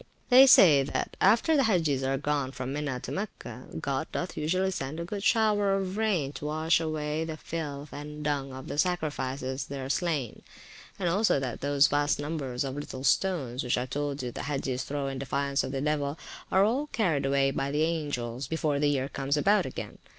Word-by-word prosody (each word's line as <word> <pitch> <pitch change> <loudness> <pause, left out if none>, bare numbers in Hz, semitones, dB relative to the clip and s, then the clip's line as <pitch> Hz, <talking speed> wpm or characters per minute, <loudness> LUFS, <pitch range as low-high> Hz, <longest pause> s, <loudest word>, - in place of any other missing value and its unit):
They 260 +1 +9
say, 160 - +8
that 135 - -3
after 230 - +4
the 275 - +4
Hagges 160 -10 +2
are 135 0 0
gone 145 -1 -1
from 130 +1 -4
Mina 145 -3 -2
to - - -6
Mecca, 205 +2 -6
God 140 - -2
doth 180 - -3
usually 185 +5 0
send 145 -2 -4
a 170 - -3
good 200 +3 -5
shower 210 -3 +3
of 190 -1 -2
rain 200 -11 0
to 145 - -8
wash 155 +2 +2
away 155 -1 -2
the 160 -1 -5
filth 150 -3 -6
and 150 +1 -7
dung 140 -2 -1
of 130 0 -8
the 145 - -4
sacrifices 140 -6 -1
there 135 -1 -5
slain; 150 - -1 0.6
and 185 - -1
also 195 -2 +3
that 130 -3 -4
those 140 0 +4
vast 145 0 +1
numbers 145 -4 -3
of 135 -1 -3
little 135 -2 -6
stones, 135 -4 +1
which 125 - 0
I 125 - -1
told 145 +1 -3
you 125 - -3
the - - -6
Hagges 135 -3 -2
throw 140 -1 -3
in 135 -1 -4
defiance 140 +1 -1
of - - -4
the 135 -1 -2
devil, 145 0 -1 0.3
are 190 +1 +5
all 265 +7 0
carried 165 - 0
away 135 0 +2
by 135 0 -2
the 150 +2 +1
angels 140 -6 -2
before 155 -2 0
the 145 0 +3
year 135 -2 0
comes 140 +1 -1
about 205 +8 +3
again. - - -7
145 Hz, 200 wpm, -28 LUFS, 135-170 Hz, 0.6 s, They